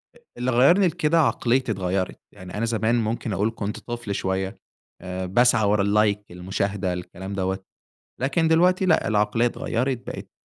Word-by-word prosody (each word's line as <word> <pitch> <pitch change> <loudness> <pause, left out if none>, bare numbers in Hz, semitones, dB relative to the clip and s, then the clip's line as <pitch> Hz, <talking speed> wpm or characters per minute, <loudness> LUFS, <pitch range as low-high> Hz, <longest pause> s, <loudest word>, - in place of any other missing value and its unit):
أ - - -17 0.2
اللي 125 +1 -1
غيّرني 170 +11 +5
لكده 160 0 +1
عقليتي 130 -4 +2
اتغيّرت، 95 -1 -2
يعني 90 -1 -11
أنا 115 - 0
زمان 115 +1 +1
ممكن 115 -1 -1
اقول 105 +5 0
كنت 105 0 -4
طفل 120 -4 -5
شوية 95 0 -2 0.4
آآ، 95 0 -4
باسعى 120 +3 +3
ورا 105 0 +3
اللايك 105 -1 +1
المشاهدة 95 +1 -2
الكلام 90 +2 -7
دَوَّة، 95 0 -1 0.6
لكن 150 +5 +1
دلوقتي 180 +3 +3
لأ 160 -3 +3
العقلية 105 +2 +2
اتغيّرت، 125 +2 -1
بقيت - - -7
105 Hz, 155 wpm, -24 LUFS, 95-125 Hz, 0.6 s, غيّرني